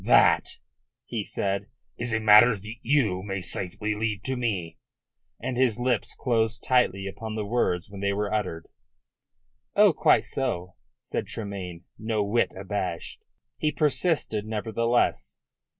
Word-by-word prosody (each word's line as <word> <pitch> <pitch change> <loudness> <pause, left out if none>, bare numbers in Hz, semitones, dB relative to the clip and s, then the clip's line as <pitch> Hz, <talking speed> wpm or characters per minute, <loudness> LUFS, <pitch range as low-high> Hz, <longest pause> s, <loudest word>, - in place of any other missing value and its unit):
"That," - - +4 0.5
he - - -3
said, 100 0 -2 0.3
"is 120 0 -3
a 110 - +1
matter 110 +2 +7
that 105 +3 -8
you 115 -9 +2
may 100 0 -3
safely 95 +4 -3
leave 105 -2 -2
to 130 - -2
me," 105 -9 -2 0.6
and 125 +1 -3
his 125 -4 +3
lips 120 -3 0
closed 115 -2 0
tightly 110 -7 +2
upon 110 +3 -5
the 105 -1 -2
words 100 -6 0
when 100 -1 -8
they 100 0 +1
were 105 +1 -1
uttered. 90 -6 -2 1.1
"Oh, - - +6
quite - - +4
so," 90 -9 -3 0.3
said - - -3
Tremayne, 95 -5 -6 0.2
no 110 -1 0
whit 110 +4 +1
abashed. 95 -3 -4 0.4
He 155 - +1
persisted 150 - +1
nevertheless. 115 +2 0
105 Hz, 135 wpm, -26 LUFS, 100-120 Hz, 1.1 s, matter